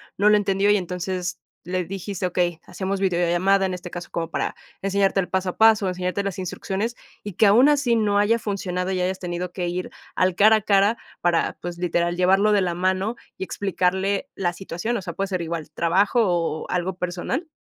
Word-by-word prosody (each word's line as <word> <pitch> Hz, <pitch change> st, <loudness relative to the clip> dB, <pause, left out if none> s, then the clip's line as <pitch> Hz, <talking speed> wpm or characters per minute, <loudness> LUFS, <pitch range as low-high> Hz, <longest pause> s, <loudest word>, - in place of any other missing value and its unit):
no 205 Hz, +2 st, +4 dB
lo 210 Hz, -, +6 dB
entendió 200 Hz, 0 st, +1 dB
y 210 Hz, -, +5 dB
entonces 180 Hz, 0 st, -4 dB, 0.2 s
le 180 Hz, +1 st, -2 dB
dijiste: 195 Hz, +1 st, -4 dB
"Okey, 175 Hz, -2 st, -1 dB
hacemos 195 Hz, 0 st, -3 dB
videollamada, 185 Hz, +1 st, +2 dB
en 185 Hz, -, -2 dB
este 180 Hz, 0 st, -7 dB
caso, 175 Hz, 0 st, -7 dB
como 165 Hz, -1 st, -3 dB
para -, -, -2 dB, 0.3 s
enseñarte 195 Hz, 0 st, +2 dB
el 185 Hz, -, 0 dB
paso 190 Hz, 0 st, -1 dB
a -, -, -7 dB
paso, 220 Hz, -2 st, +5 dB
enseñarte 180 Hz, +2 st, -2 dB
las 200 Hz, -2 st, -4 dB
instrucciones", 195 Hz, +5 st, -3 dB, 0.3 s
y 205 Hz, -, -6 dB
que 210 Hz, -, +4 dB
aun 235 Hz, +7 st, +6 dB
así 285 Hz, -5 st, +3 dB
no 205 Hz, -2 st, +2 dB
haya 215 Hz, +3 st, +3 dB
funcionado 190 Hz, -4 st, -3 dB
y 185 Hz, -1 st, -1 dB
hayas 185 Hz, +1 st, -1 dB
tenido 180 Hz, -1 st, -4 dB
que 175 Hz, -1 st, -3 dB
ir 180 Hz, +1 st, -3 dB, 0.2 s
al 185 Hz, -1 st, +1 dB
cara 215 Hz, +3 st, +6 dB
a -, -, -3 dB
cara 200 Hz, +2 st, +3 dB, 0.2 s
para, 175 Hz, -1 st, +1 dB
pues, 175 Hz, 0 st, -6 dB
literal, 175 Hz, 0 st, 0 dB
llevarlo 190 Hz, +4 st, +3 dB
de 205 Hz, -1 st, +4 dB
la 175 Hz, -2 st, -1 dB
mano 190 Hz, +5 st, 0 dB, 0.2 s
y -, -, -2 dB
explicarle 195 Hz, +4 st, -1 dB
la 175 Hz, -2 st, -1 dB
situación. 190 Hz, +5 st, -4 dB
O -, -, -4 dB
sea, 180 Hz, -2 st, -6 dB
puede 195 Hz, +3 st, -2 dB
ser 185 Hz, -2 st, -2 dB
igual, 165 Hz, -2 st, -5 dB
trabajo 190 Hz, +9 st, +2 dB
¿o 170 Hz, -3 st, -1 dB
algo 180 Hz, +1 st, -1 dB
personal? 180 Hz, -, -3 dB
190 Hz, 200 wpm, -23 LUFS, 175-200 Hz, 0.3 s, lo